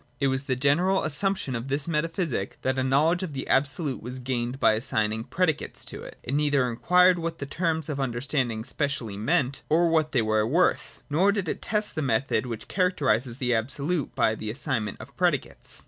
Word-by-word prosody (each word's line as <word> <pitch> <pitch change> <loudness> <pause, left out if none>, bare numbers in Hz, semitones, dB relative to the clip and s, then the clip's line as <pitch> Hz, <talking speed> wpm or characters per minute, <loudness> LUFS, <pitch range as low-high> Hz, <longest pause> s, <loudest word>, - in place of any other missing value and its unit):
It 140 - +2
was 130 0 0
the 130 - 0
general 165 +9 +2
assumption 155 -3 -1
of 115 +3 -4
this 140 +2 -1
metaphysic 165 - -1
that 130 0 0
a - - +1
knowledge 150 +7 +3
of 180 -6 -4
the 135 - -5
Absolute 140 +1 +1
was 125 +3 -6
gained 125 0 -3
by - - +5
assigning 110 -1 0
predicates 160 +5 -1
to - - -7
it. - - -10
It 130 - -4
neither 145 -3 +2
inquired 180 +9 +4
what 165 0 -3
the 140 - -5
terms 160 +1 -1
of 150 -3 -3
the 140 - 0
understanding 120 -2 -1
specially 135 -6 -2
meant 125 +6 0
or 170 +2 +4
what 155 -2 +2
they 120 -4 +2
were 110 0 +1
worth, 175 +8 +1
nor 175 +7 +3
did 200 -3 -2
it - - -3
test 210 +1 -1
the 155 - -2
method 130 0 0
which 115 -2 -6
characterises 135 - +1
the 125 -3 0
Absolute 140 +7 -1
by 110 - +3
the 110 -1 -5
assignment 115 -4 -2
of - - -11
predicates. - - -1
140 Hz, 195 wpm, -26 LUFS, 120-165 Hz, -, by